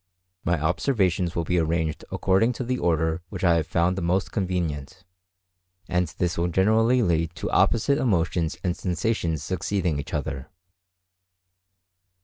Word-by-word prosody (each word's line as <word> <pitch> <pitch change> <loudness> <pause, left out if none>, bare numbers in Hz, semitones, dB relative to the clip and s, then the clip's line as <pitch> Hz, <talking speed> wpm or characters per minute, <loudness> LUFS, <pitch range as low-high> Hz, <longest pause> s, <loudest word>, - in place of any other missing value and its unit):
My 85 -2 +1
observations 90 - +1
will 85 - 0
be 90 +2 +1
arranged 80 -1 -1
according 100 +6 +2
to 125 - -4
the 125 +1 -2
order 80 0 +1
which - - -6
I 85 -2 +4
have 80 0 -1
found 90 +1 +1
the 95 - -3
most 90 +3 0
convenient; 90 -4 -3 0.8
and 90 0 +1
this 90 -1 -1
will 85 - +1
generally 110 +7 +3
lead 85 -3 0
to - - -4
opposite 140 +5 +3
emotions 85 - 0
and 90 -2 0
sensations 85 -3 -1
succeeding 90 -3 -1
each - - -5
other. 70 -2 -4
90 Hz, 140 wpm, -25 LUFS, 80-95 Hz, 0.8 s, I